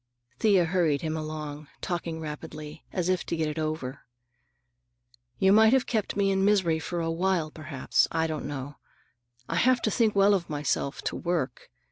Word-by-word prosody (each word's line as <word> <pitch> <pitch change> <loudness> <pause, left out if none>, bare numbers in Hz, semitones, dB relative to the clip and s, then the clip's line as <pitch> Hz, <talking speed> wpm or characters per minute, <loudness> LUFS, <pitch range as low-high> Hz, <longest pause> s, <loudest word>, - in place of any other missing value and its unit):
Thea 195 -5 +4
hurried 165 -4 +1
him 160 0 -1
along, 155 -1 -5
talking 170 -2 -3
rapidly, 155 0 -7
as 180 -2 -1
if 185 -1 +1
to - - -1
get 160 -1 0
it 150 +1 -3
over. 155 -4 -3 1.4
"You 190 0 +4
might 220 +2 +6
have 265 -1 +3
kept 215 -4 -1
me 195 -1 +2
in 190 0 +1
misery 190 -6 +3
for 170 +1 -3
a 165 0 -1
while, 170 -2 0
perhaps. 155 -4 0
I 160 0 +1
don't 155 -3 -3
know. 145 0 -6 0.7
I 165 - -2
have 255 +6 +4
to 215 - +1
think 220 -2 +2
well 200 +1 +5
of 180 -4 -1
myself, 145 -1 -2
to - - -2
work. 170 -8 -2
165 Hz, 175 wpm, -27 LUFS, 155-190 Hz, 1.4 s, might